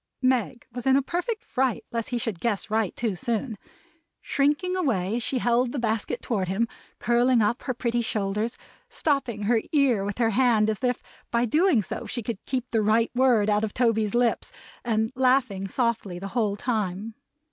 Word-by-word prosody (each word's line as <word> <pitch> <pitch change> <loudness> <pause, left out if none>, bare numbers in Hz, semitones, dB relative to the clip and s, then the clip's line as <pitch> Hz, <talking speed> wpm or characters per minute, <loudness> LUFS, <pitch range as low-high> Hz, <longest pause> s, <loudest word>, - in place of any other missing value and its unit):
Meg 255 -2 +1
was 245 +2 -5
in 265 - +5
a 275 - +4
perfect 360 - -3
fright 260 -2 -1
lest 230 -2 -3
he 245 - -1
should 225 -6 -3
guess 215 -1 -2
right 220 -4 0
too 225 -5 -1
soon; 230 +3 -2 0.6
shrinking 295 +6 0
away, 225 - 0
as - - -2
she 255 - 0
held 240 0 +2
the 285 - -4
basket 225 -1 -1
toward 200 -6 -1
him; 200 +6 0 0.3
curling 240 +1 +3
up 220 +2 +1
her 255 - -2
pretty 240 -1 0
shoulders; 215 +1 -2 0.3
stopping 255 -8 -1
her 225 +2 +2
ear 270 - +3
with 200 0 -4
her 230 -2 +2
hand, 225 -2 +3
as 215 - -4
if 250 -2 0 0.3
by 235 0 +1
so - - +3
doing 300 - +3 0.2
she 240 - -4
could 220 -1 -5
keep 255 -2 -2
the 225 - +2
right 220 +2 +2
word 245 -5 +3
out 210 0 +2
of 215 - -3
Toby's 225 -3 +1
lips; 240 -1 +1 0.3
and 220 -1 0
laughing 255 -7 +2
softly 225 -4 -1
the 195 +2 -6
whole 215 -3 0
time. 215 -2 -2
235 Hz, 185 wpm, -26 LUFS, 215-255 Hz, 0.6 s, in